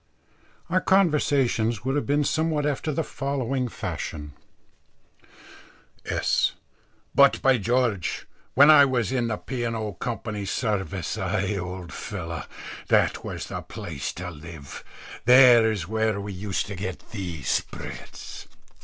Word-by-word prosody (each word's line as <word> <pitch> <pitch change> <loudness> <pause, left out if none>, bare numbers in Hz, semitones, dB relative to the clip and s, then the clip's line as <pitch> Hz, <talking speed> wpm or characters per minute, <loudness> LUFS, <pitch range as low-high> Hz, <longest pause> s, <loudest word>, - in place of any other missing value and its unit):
Our 185 +2 +1
conversation 145 - +3
would 135 +2 0
have 145 - -1
been 145 +1 +2
somewhat 155 0 0
after 150 +1 -1
the 160 +3 -1
following 135 -3 -2
fashion: 75 -9 -5 1.7
S. - - +1 0.6
"But, 140 0 +6
by 130 -2 +4
George, 110 -5 0 0.3
when 145 +3 +8
I 150 -2 +9
was 125 -4 +1
in 125 -3 0
the 110 -2 -2
P. 125 -3 -4
& 115 0 -2
O. 110 -2 -3
Co.'s 105 -1 -4
Service 95 -6 -2
ay, 95 +1 -1
old 90 -1 -5
fellows, 85 -5 -5 0.4
that - - +2
was - - -5
the - - -5
place 75 -5 -5
to 90 0 -6
live 80 -3 -10 0.4
there 125 -2 +8
is 95 -6 -3
where 110 -1 0
we 100 0 -5
used 95 +1 -2
to 100 - -6
get 95 -1 -6
the 90 -8 -5
spreads." - - -4
110 Hz, 135 wpm, -25 LUFS, 95-135 Hz, 1.7 s, I